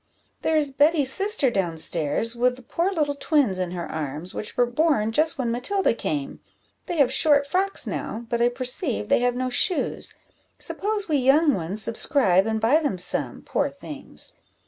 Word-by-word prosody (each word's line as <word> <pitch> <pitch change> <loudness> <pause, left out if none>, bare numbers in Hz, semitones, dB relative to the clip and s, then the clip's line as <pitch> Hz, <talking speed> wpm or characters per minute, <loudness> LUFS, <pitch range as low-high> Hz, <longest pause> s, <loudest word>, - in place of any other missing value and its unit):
there 320 - 0
is 290 -2 +1
Betty's 290 -1 +3
sister 395 - +1
down 175 -6 -1
stairs, 160 +8 +1
with 250 +1 +1
the 255 - -15
poor 340 +10 -1
little 300 -6 0
twins 280 - +1
in 180 -1 -2
her 175 -1 -5
arms, 155 +3 -3
which 210 - -7
were 245 - +4
born 245 -3 +1
just 315 +6 +1
when 245 -3 -1
Matilda 320 +11 +1
came; 150 -10 -4 0.5
they 345 - -3
have 265 -3 +3
short 285 0 +4
frocks 380 +7 0
now, 230 +2 -5
but 235 0 -1
I 240 - +4
perceive 245 - -2
they - - +4
have 245 0 +1
no 255 0 -2
shoes: 360 - 0 0.4
suppose 415 0 -3
we 305 -3 +1
young 280 +4 +4
ones 190 +4 0
subscribe, 220 -5 +2
and 220 0 -1
buy 235 +8 +3
them 285 - -2
some, 180 0 -1
poor 285 - -1
things! 280 +1 -9
255 Hz, 180 wpm, -24 LUFS, 215-300 Hz, 0.5 s, were